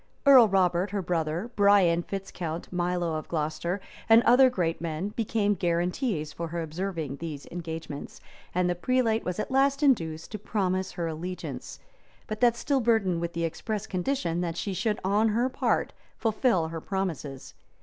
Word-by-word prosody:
Earl 260 -5 +9
Robert, 185 -1 +2
her 200 -1 -2
brother, 170 +5 -2
Brian 200 -4 +5
Fitz 195 +2 -6
Count, 170 0 -5
Milo 175 -1 0
of 155 - -7
Glocester, 160 +3 -2 0.3
and 225 +1 +7
other 255 +2 +6
great 170 -9 -1
men, 165 +3 -3
became 210 -1 0
guaranties 175 - -1
for 170 +2 -4
her 170 +1 -3
observing 160 -3 -4
these 155 -3 -6
engagements;[*] 160 -4 -6 0.4
and 180 0 +2
the 175 - +2
prelate 230 +4 +1
was 180 +2 -3
at 215 - -3
last 275 +2 +2
induced 165 - +1
to 215 - -5
promise 190 -2 -1
her 175 -2 -3
allegiance, 170 +3 -6 0.5
but 215 +1 -6
that 240 -1 +5
still 275 +3 0
burdened 210 -7 +2
with 170 0 -3
the 170 - -2
express 205 +6 -3
condition, 180 -3 -1
that 170 -1 -3
she 200 - -2
should 210 +3 -1
on 205 +4 +3
her 235 +4 +1
part - - 0 0.2
fulfil 215 -7 +1
her 165 -1 -5
promises. 165 -9 -4
180 Hz, 165 wpm, -27 LUFS, 165-215 Hz, 0.5 s, Earl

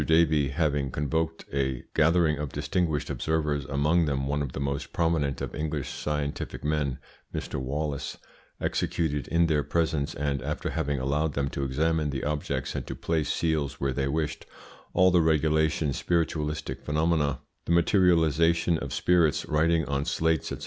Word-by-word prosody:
Davey, 80 -2 +3
having 70 -1 0
convoked 80 +4 -2
a 65 -3 -1
gathering 80 -1 +3
of 75 -2 -3
distinguished 75 +1 -1
observers, 75 -3 -1
among 75 +5 +2
them 70 -2 -1
one 70 +1 0
of 70 -3 -4
the - - -4
most 70 0 -2
prominent 80 -6 0
of - - -4
English 75 -3 -3
scientific 75 -1 -3
men, 75 -3 0 0.3
Mr. 70 - -4
Wallace, 70 +2 -3 0.4
executed 75 -6 -1
in 85 0 +3
their 75 -3 +2
presence, 80 -1 0
and 70 -1 -1
after 75 +3 -3
having 75 -1 -1
allowed 75 +4 0
them 70 -1 0
to 70 - -3
examine 75 +3 +1
the 70 -2 -3
objects 75 0 -2
and - - -4
to - - -4
place 80 -3 -1
seals 75 -4 -1
where 70 -1 0
they 70 +1 -1
wished, 75 +1 -2 0.5
all 90 +1 +6
the 90 -1 +5
regulation 80 -1 +2
spiritualistic 75 -5 -1
phenomena, 75 -1 +1 0.3
the - - -2
materialisation 85 -2 +3
of - - -5
spirits, 85 -4 +2
writing 80 +1 +2
on 70 0 -1
slates, 80 -1 0
&c. - - -4
75 Hz, 155 wpm, -27 LUFS, 70-80 Hz, 0.5 s, all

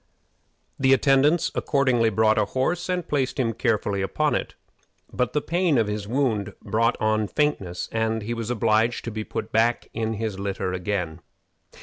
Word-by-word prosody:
The 135 0 +5
attendants 140 +5 +3
accordingly 130 -5 +2
brought 110 +1 +3
a 105 - +2
horse 170 - -1
and 180 -2 -1
placed 140 -1 -1
him 115 -3 +1
carefully 105 -5 0
upon 95 - 0
it; - - -3 0.6
but 125 - -1
the 150 - 0
pain 170 -4 +1
of 115 - +3
his 105 -1 -4
wound 110 -5 -1
brought 115 +2 +1
on 110 -1 +1
faintness, 100 - -1
and 110 -1 -1
he 115 +3 -3
was 115 -1 -4
obliged 115 0 +1
to 115 - -3
be 110 0 -4
put 110 - -5
back 115 +2 +1
in 110 -1 -2
his 110 -2 -4
litter 95 -2 -2
again. 90 -3 -3
115 Hz, 165 wpm, -24 LUFS, 105-130 Hz, 0.6 s, The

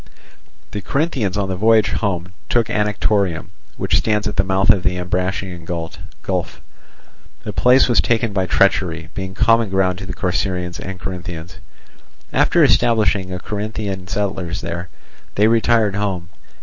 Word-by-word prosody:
The 105 - -4
Corinthians 130 - -1
on 100 -2 0
the 95 - -2
voyage 110 +3 +4
home 90 -4 -2 0.2
took 115 -2 +1
Anactorium, 105 -5 0 0.3
which - - +1
stands 105 -1 0
at 105 - -4
the 95 - +3
mouth 95 +2 +4
of 100 -4 +1
the 90 +1 0
Ambracian 90 0 -2
gulf. 85 -1 -5 0.8
The - - -5
place 125 +2 +5
was 120 - +4
taken 115 -2 0
by 95 -2 0
treachery, - - +1
being 95 0 -5
common 115 -1 +3
ground 95 -1 +1
to 95 - -7
the - - -5
Corcyraeans 90 -1 -2
and 95 -1 -6
Corinthians. 90 -2 -7 0.7
After - - +4
establishing 105 -6 +2
Corinthian 100 -1 -4
settlers 95 -3 -2
there, 85 +1 -5 0.5
they 105 +2 +4
retired 115 -2 +3
home. 95 -4 -2
95 Hz, 140 wpm, -19 LUFS, 90-105 Hz, 0.8 s, place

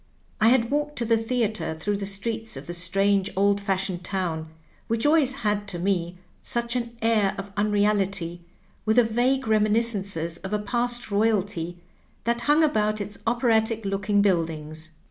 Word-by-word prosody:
I 220 - +4
had 235 -1 +3
walked 295 +1 -1
to 235 - -1
the 230 0 +3
theatre 225 -6 -1
through 205 +5 -1
the 200 -1 -3
streets 220 -1 -3
of 135 - -8
the 175 - -5
strange 195 +3 +2
old 200 +1 +3
fashioned 190 -2 -1
town, 175 -4 -2 0.4
which 230 +2 0
always 295 -3 +4
had 205 0 0
to 190 -3 -2
me 175 -1 -1 0.2
such 235 0 -2
an 235 -1 -3
air 215 -4 +2
of 195 0 -6
unreality, 200 -4 0 0.4
with 220 0 +1
the 245 - +6
vague 245 +3 +1
reminiscences 210 -6 +1
of 190 +2 -6
a - - +3
past 240 +2 -2
royalty 200 -5 0 0.5
that 235 +1 0
hung 295 +6 +4
about 215 -7 +1
its 205 0 -6
operatic 225 -2 +1
looking 200 +1 +1
build 175 -5 +2
ings. 155 0 -7
205 Hz, 165 wpm, -25 LUFS, 190-230 Hz, 0.5 s, the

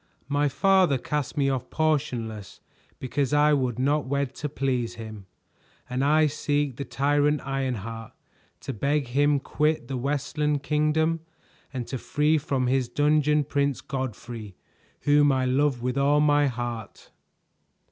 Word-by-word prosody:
My 145 0 +2
father 185 -1 +3
cast 145 +2 -3
me 140 -1 +2
off 130 -3 -2
portionless 125 -10 -2 0.4
because 135 +1 -2
I 150 +1 +5
would 130 -5 0
not 140 +2 +1
wed 140 -1 -1
to 150 - -3
please 130 -4 -1
him; 110 -4 -9 0.6
and 125 +2 -1
I 155 +2 +4
seek 145 -3 -1
the 140 - -4
tyrant 145 +1 +1
Ironheart, 115 -5 -4 0.5
to - - -5
beg 140 +3 0
him 145 +3 +3
quit 150 -2 0
the 130 - -3
Westland 145 +2 -1
Kingdom 155 +2 +1 0.5
and 130 -3 -4
to 130 - -5
free 150 +4 +1
from 135 -4 -1
his 130 -1 +1
dungeon 150 +2 +2
Prince 140 -1 0
Godfrey, 120 -6 -6 0.5
whom 145 0 +4
I 130 -1 +1
love 130 -1 +1
with 125 +2 -1
all 145 +2 +3
my 145 -1 +4
heart." 120 -4 -6
140 Hz, 140 wpm, -26 LUFS, 125-150 Hz, 0.6 s, I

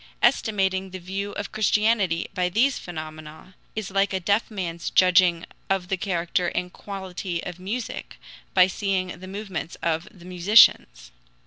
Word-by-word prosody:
Estimating 195 -6 +2
the 185 - -7
value 195 +3 -4
of 205 - -5
Christianity 210 -4 +2
by 180 -1 0
these 245 +9 +2
phenomena 155 +1 -9 0.2
is 215 -3 -4
like 195 +1 +1
a 190 - 0
deaf 200 +5 +1
man's 170 -5 -4
judging 180 -2 +4 0.2
of 190 -2 0
the 190 - +1
character 175 -2 -1
and 180 +1 -3
quality 190 -3 -5
of 180 0 -7
music 220 +6 -5 0.4
by 185 -1 +8
seeing 190 -1 -1
the 185 - -9
movements 195 -3 -5
of 165 0 0
the 175 -3 -16
musicians. 175 - +4
185 Hz, 145 wpm, -24 LUFS, 175-200 Hz, 0.4 s, by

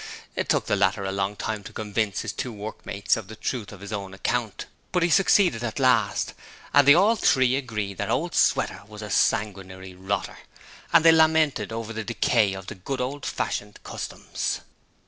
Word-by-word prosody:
It - - -2
took - - +2
the - - +1
latter 100 0 +1
a 95 - -2
long 100 +1 -1
time 105 0 -4
to - - -9
convince 105 -1 -2
his - - -4
two 125 - -4
workmates 105 -1 -2
of 110 -4 -7
the 110 - -9
truth 110 -1 -4
of 100 -2 -12
his 100 +2 -7
own 100 -2 -5
account, 115 +1 -2 0.3
but 180 -2 +1
he 170 - +2
succeeded 180 - +4
at 110 -2 -3
last, 120 -7 +2 0.4
and 145 -1 +6
they 145 - +9
all 205 +6 +4
three 130 - +3
agreed 105 -7 -4
that - - -2
Old - - -1
Sweater - - +2
was 105 0 -9
a 105 - -6
sanguinary 95 -2 -1
rotter, 95 +2 -3 0.5
and 165 -1 +5
they 165 - +9
lamented 160 -8 +3
over 115 0 -5
the 110 0 -4
decay 110 -2 +2
of 95 -1 -8
the - - -6
good 125 +8 -5
old 135 +3 -3
fashioned 105 0 -3
customs. - - -4
110 Hz, 190 wpm, -25 LUFS, 100-130 Hz, 0.5 s, they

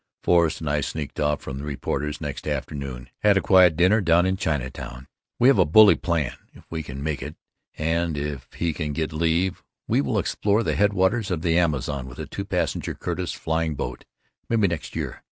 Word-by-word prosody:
Forrest 85 -3 +3
and 80 - -4
I 75 0 +1
sneaked 75 0 -5
off 75 -1 +1
from 70 0 -6
the - - -6
reporters 75 0 -3
next 75 -3 -5
afternoon, 70 -4 -4
had 100 -2 +4
quiet 90 -4 +6
dinner 95 +6 +4
down 85 -1 +4
in 95 0 +1
Chinatown. 65 -6 -4 0.3
We 125 - +4
have 135 -7 +5
a - - +7
bully 100 +7 +7
plan. 80 -6 -1 0.2
If - - -15
we 80 -1 -2
can 70 -2 -7
make 75 -3 -2
it 75 +4 -6 0.4
and 80 0 0
if 70 -3 -5
he 85 -2 -1
can 75 -2 -3
get 80 +1 -2
leave 85 +4 0 0.3
we - - +2
will 70 - -1
explore 105 +2 +1
the - - 0
headwaters 100 +2 +2
of 85 -3 -2
the 85 -2 +2
Amazon 75 -5 0
with 60 - -11
a - - -5
two - - -6
passenger - - -2
Curtiss - - -3
flying 80 -1 -1
boat, 60 -2 -5 0.4
maybe 115 -3 +3
next 85 -3 -5
year. - - -4
80 Hz, 195 wpm, -24 LUFS, 70-90 Hz, 0.4 s, a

